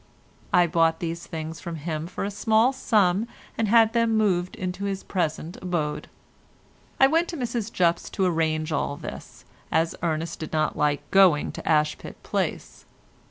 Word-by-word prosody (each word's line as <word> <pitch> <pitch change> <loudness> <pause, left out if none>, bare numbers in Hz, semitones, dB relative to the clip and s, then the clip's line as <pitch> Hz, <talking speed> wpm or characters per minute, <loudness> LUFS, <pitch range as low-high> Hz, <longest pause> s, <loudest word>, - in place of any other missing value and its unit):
I 175 - +5
bought 165 -1 +2
these 170 0 -4
things 160 +1 -6
of 170 -1 -4
him 155 +1 -4
for 180 - -5
a 200 - -2
small 220 +5 +3
sum 210 -4 +2 0.3
and 225 - 0
had 225 +1 +5
them 230 -2 +2
moved 185 -4 +1
into 185 +2 -4
his 195 -1 -3
present 165 -1 -2
abode. 170 -5 -2 0.9
I 270 - +8
went 325 +5 +2
to 335 - -5
Mrs 235 -3 -3
Jupp's 170 -1 +1
to 190 - +2
arrange 160 -2 0
all 145 -1 -1
this, - - -9 0.3
as 165 0 +2
Ernest 165 -1 -2
did 155 - -6
not 155 -1 +1
like 145 -1 0
going 185 -6 +5
to - - -7
Ashpit 150 -1 +1
Place. - - -3
175 Hz, 160 wpm, -25 LUFS, 160-210 Hz, 0.9 s, I